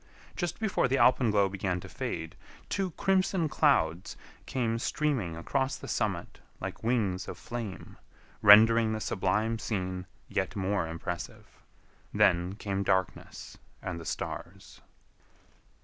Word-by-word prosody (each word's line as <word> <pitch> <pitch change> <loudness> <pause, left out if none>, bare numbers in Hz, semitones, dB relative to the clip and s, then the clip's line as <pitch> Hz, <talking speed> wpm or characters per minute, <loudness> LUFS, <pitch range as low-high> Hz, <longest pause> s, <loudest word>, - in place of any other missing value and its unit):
Just 175 -2 -3
before 215 - +1
the 135 +2 +1
alpenglow 110 -7 +4
began 95 -2 -2
to - - -9
fade, - - -5 0.3
two 195 -2 -1
crimson 190 -3 +2
clouds 120 - +1 0.3
came 115 -3 -1
streaming 120 - -1
across 135 +10 -1
the - - -9
summit - - -2 0.2
like - - -6
wings 110 -6 0
of - - -6
flame, 115 -7 -7 0.4
rendering 110 +2 +7
the 110 - -2
sublime 105 +3 0
scene 95 -4 -3 0.2
yet 95 - -2
more 95 -3 0
impressive; 85 +2 -7 0.5
then 90 +2 +3
came 100 -2 -3
darkness 95 -2 -2 0.2
and 90 -2 -5
the - - -8
stars. - - -6
105 Hz, 120 wpm, -29 LUFS, 95-125 Hz, 0.5 s, rendering